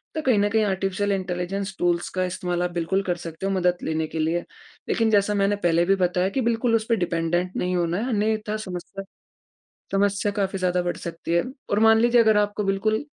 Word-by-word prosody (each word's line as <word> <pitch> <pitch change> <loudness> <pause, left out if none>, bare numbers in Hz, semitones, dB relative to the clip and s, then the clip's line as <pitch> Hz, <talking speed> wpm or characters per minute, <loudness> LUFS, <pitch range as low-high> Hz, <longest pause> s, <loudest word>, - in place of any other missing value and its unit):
तो 315 - -1
कहीं 255 -7 +2
न 205 0 +2
कहीं 220 +1 +2
आर्टिफिशियल 195 +1 -1
इंटेलिजेंस 190 +1 -3
टूल्स 175 -1 +1
का 185 0 -1
इस्तेमाल 180 -1 -2
आप 180 - -1
बिल्कुल 175 +3 0
कर 180 -2 -1
सकते 165 +2 -7
हैं 195 - 0
मदद 180 -1 +1
लेने 160 0 -1
के 160 - -5
लिए। 160 +2 +1 0.5
लेकिन 225 -1 +2
जैसा 205 0 +3
मैंने 200 0 +2
पहले 170 -3 +2
भी 195 +1 +3
बताया 180 0 +1
कि 260 +7 -1
बिल्कुल 230 0 +1
उस 220 -1 0
पे 230 - +4
डिपेंडेंट 175 0 -1
नहीं 180 0 -1
होना 175 0 0
है 240 +5 -2
अन्यथा 215 -1 0
समस्या 190 -1 -7 0.9
समस्या 200 +1 +1
काफ़ी 195 -1 -1
ज़्यादा 180 -1 +1
बढ़ 175 - -2
सकती 165 0 -5
है। 170 - +3 0.3
और 205 - +2
मान 225 0 +6
लीजिए 240 0 +5
अगर 220 -2 +4
आपको 205 0 0
बिल्कुल 205 +4 0
195 Hz, 210 wpm, -24 LUFS, 175-210 Hz, 0.9 s, मान